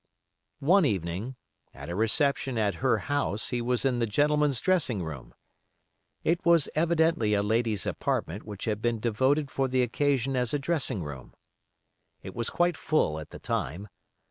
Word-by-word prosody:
One 180 +7 +5
evening, 100 - -2 0.4
at - - -9
a - - -3
reception 130 - +1
at 105 -2 +1
her 130 -1 +3
house, 145 -7 -1
he 120 -1 -1
was 125 +2 0
in 125 -3 +1
the 115 - +1
gentlemen's 145 +3 +2
dressing 150 - +1
room. 75 -6 -8 0.9
It 170 +2 +1
was 170 -3 +4
evidently 160 -9 +2
a 100 - +1
lady's 110 -1 0
apartment 90 +6 -2
which 105 -2 -7
had 105 -1 -2
been 120 -1 0
devoted 130 +6 +1
for 135 +1 0
the 130 0 +2
occasion 135 +1 0
as 125 +1 0
a - - +3
dressing 140 - -1
room. 65 -4 -9 0.9
It - - -8
was 120 -2 -1
quite 175 -2 +1
full 110 - +1
at 75 - -9
the - - -9
time. 90 +10 -3
125 Hz, 165 wpm, -28 LUFS, 105-145 Hz, 0.9 s, One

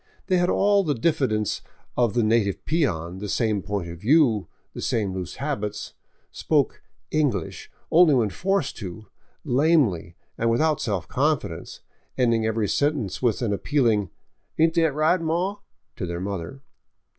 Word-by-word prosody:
They 185 - +2
had 175 0 +2
all 200 0 +3
the 150 -5 0
diffidence 115 - 0 0.3
of 120 -3 +1
the 120 - +3
native 110 -3 +1
peon, 95 - -1
the 105 0 -5
same 105 -1 0
point 100 -3 -3
of 85 0 -8
view, 115 - +3 0.3
the - - -7
same 100 -4 -1
loose 90 -1 -5
habits, 105 -8 -4 0.4
spoke - - 0 0.2
" - - -42
English 135 - -1
" - - -40
only 165 -3 +6
when 110 -5 +1
forced 195 - -1
to, 105 +1 -7 0.4
lamely 130 - +2 0.2
and 115 - +2
without 155 +6 +2
self 100 -8 -2
confidence, 150 +2 -2 0.4
ending 115 -3 +2
every 110 -1 0
sentence 140 - 0
with 120 -1 +1
an 105 -3 +1
apvpealing, 115 - +1 0.2
" - - -48
Ain't 160 +1 +3
thet 165 -4 +2
right, 160 +4 +2
maw?" 175 +5 -1 0.4
to 95 -7 -3
their 85 0 -4
mother. 100 +7 -5
120 Hz, 155 wpm, -24 LUFS, 100-155 Hz, 0.4 s, only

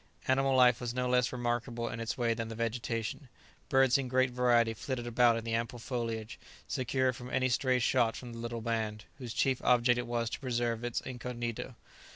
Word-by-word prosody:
Animal 135 0 +3
life 125 -2 +5
was 120 0 -3
no 125 0 0
less 125 0 +2
remarkable 120 -1 -2
in 115 - -5
its 115 0 -3
way 120 -2 +2
than 115 0 -4
the 115 - -6
vegetation. 115 +3 -3 0.4
Birds 135 0 +4
in 135 - -2
great 130 0 +2
variety 120 -2 +3
flitted 120 +2 -4
about 120 0 +4
in 115 - -4
the 115 0 -3
ample 115 +1 -1
foliage, 115 -3 -4 0.3
secure 130 0 0
from 125 0 -9
any 130 0 +1
stray 130 +1 +2
shot 115 -1 +2
from 120 -2 -8
the 115 - -8
little 115 0 -4
band, 110 -2 -2
whose 125 -3 -6
chief 130 +2 +1
object 125 0 +4
it 120 - -4
was 120 -1 -1
to - - -4
preserve 120 -3 -1
its 120 -1 -2
incognito. 120 -1 -5
120 Hz, 200 wpm, -31 LUFS, 115-125 Hz, 0.4 s, life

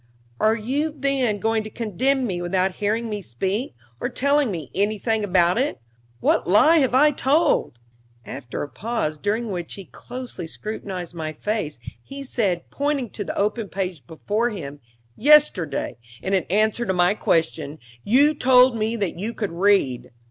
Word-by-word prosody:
"Are 220 +1 +3
you, 270 +8 -1
then, 275 -6 0
going 225 +1 0
to 215 - -7
condemn 250 +5 0
me 180 -6 -3
without 185 +1 0
hearing 220 +3 -1
me 210 -2 -4
speak, 190 - -3 0.2
or - - -2
telling 280 +1 +2
me 170 -6 -5
anything 215 +2 0
about 180 0 +3
it? 275 - -1 0.4
What - - +2
lie 305 - +6
have 260 -3 +2
I 295 +3 +6
told?" 275 - +1 0.5
After 130 -3 -6
a - - -5
pause, 185 -5 -3
during 215 +4 -1
which 175 -3 -5
he 195 - -9
closely 245 -3 -8
scrutinized 190 -3 -6
my 160 -2 -4
face, 155 - -3 0.2
he 275 0 -8
said, 200 -10 -1
pointing 280 -5 -1
to 205 - -5
the - - -5
open 210 +1 -1
page 180 -9 -4
before 210 +8 -1
him: 145 -10 -7 0.4
"Yesterday, 225 - +3 0.2
in 190 - -3
answer 215 +5 +1
to 190 - 0
my 180 +1 +3
question, 160 -6 0 0.3
you 280 +7 +4
told 255 -3 +5
me 220 +1 -1
that 200 -6 -3
you 225 +5 -4
could 205 -5 -3
read. 170 -10 +2
210 Hz, 160 wpm, -23 LUFS, 180-250 Hz, 0.5 s, lie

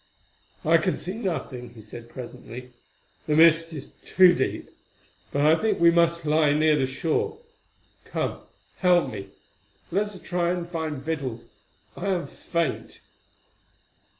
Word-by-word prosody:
"I 165 +2 +6
can 180 +3 0
see 185 - -5
nothing," 135 - -4
he 110 - -11
said 115 +2 -10
presently—"the 125 +4 -8
mist 165 +1 +5
is 145 -4 -7
too 185 -1 +6
deep; 130 - -2 0.6
but 145 +1 +1
I 155 - +7
think 220 +5 0
we 170 0 +7
must 170 -1 +2
lie 150 -1 +3
near 155 +1 +4
the 135 -3 +1
shore. 155 - -1 0.7
Come, - - -3 0.4
help 180 -2 +3
me. 100 -2 -7 0.6
Let 200 +4 +1
us 200 -3 -10
try 175 -1 0
to 175 -1 -4
find 160 -5 -4
victuals; 135 -7 -3 0.5
I 200 - -4
am 185 -3 0
faint." 170 -5 -3
160 Hz, 135 wpm, -25 LUFS, 135-175 Hz, 0.7 s, I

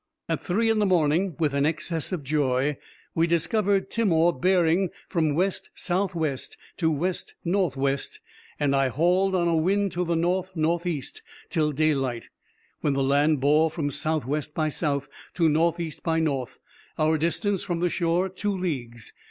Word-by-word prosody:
_—At 165 - -1
three 225 +5 +1
in 220 - +1
the 205 - +3
morning, 170 +1 +2
with 155 -4 0
an 140 0 +1
excess 160 +2 -1
of 175 -6 -3
joy, 140 -1 +1 0.4
we 165 +1 +2
discovered 195 +4 +1
Timor 175 -7 +3
bearing 180 +3 +2 0.2
from 160 -4 0
west 185 +3 -1
south 185 +1 -1
west 155 -5 -2 0.2
to 165 -3 +2
west 170 +4 -2
north 175 -4 +1
west, 135 0 -1 0.4
and 140 -1 +2
I 135 -1 +3
hauled 180 +8 +2
on 175 -2 +2
a 170 - +2
wind 195 +5 +1
to 180 - -1
the 170 -1 0
north 180 +3 0
north 170 +2 0
east 150 -7 -3 0.3
till 155 -3 +1
daylight, 135 -5 0 0.5
when 145 - 0
the 135 0 +1
land 145 +1 +2
bore 150 +3 +4
from 150 -2 -3
south 155 +1 -1
west 150 +2 -3
by 155 -1 +1
south 145 -2 -1 0.3
to 165 -3 +3
north 165 +2 +2
east 160 -3 -5
by 165 0 0
north; 140 -6 -2 0.4
our 155 +1 +3
distance 175 +5 0
from 175 -2 -3
the 175 0 +1
shore 175 +2 +1
two 195 +1 -3
leagues. 120 - -4
165 Hz, 175 wpm, -25 LUFS, 145-180 Hz, 0.5 s, bore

